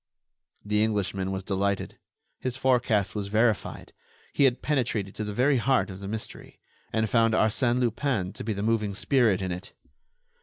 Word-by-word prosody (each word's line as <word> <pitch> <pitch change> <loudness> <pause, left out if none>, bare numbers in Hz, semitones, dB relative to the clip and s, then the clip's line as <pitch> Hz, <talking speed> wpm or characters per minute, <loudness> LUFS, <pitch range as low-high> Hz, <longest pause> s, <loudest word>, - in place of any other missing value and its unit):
The 105 +1 +2
Englishman 100 -3 -1
was 95 0 -3
delighted. 100 0 -2 0.4
His 130 0 -3
forecast 125 -6 +2
was 105 -2 -3
verified; 110 +1 0 0.4
he 140 - +4
had 125 -2 +1
penetrated 115 -9 -1
to 110 - -4
the 105 - -4
very 130 +6 +3
heart 125 -3 +1
of 95 - -9
the 100 - -7
mystery, 110 +2 -7 0.3
and 110 0 +1
found 115 0 +3
Arsène 120 +3 +2
Lupin 120 -5 0
to - - -7
be 110 - -1
the 100 0 -4
moving 110 -3 0
spirit 110 -4 +2
in 95 - -2
it. 90 +2 -7
110 Hz, 165 wpm, -27 LUFS, 100-120 Hz, 0.4 s, he